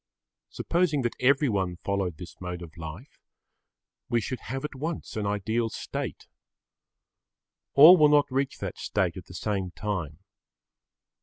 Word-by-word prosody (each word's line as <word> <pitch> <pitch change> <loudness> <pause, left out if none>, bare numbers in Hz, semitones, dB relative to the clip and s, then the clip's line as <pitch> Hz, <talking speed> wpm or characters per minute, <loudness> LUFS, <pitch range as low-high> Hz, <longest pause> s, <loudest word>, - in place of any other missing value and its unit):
Supposing 165 -6 0
that 120 - -1
everyone 125 -9 +2
followed 100 -5 -1
this 85 -1 -10
mode 90 -1 -5
of 85 +1 -12
life, 85 - -9 0.9
we 120 - +2
should 120 +3 -4
have 135 +4 -4
at - - -5
once 155 +5 -5
an 105 -2 -2
ideal 110 +3 0
state. - - -5 1.5
All 160 +6 +10
will 150 -2 +6
not 145 -1 +5
reach 135 +1 -1
that - - -6
state 95 -4 0
at 90 -2 -8
the 90 - -12
same 95 -1 -2
time. 95 -8 -3
105 Hz, 140 wpm, -27 LUFS, 90-135 Hz, 1.5 s, All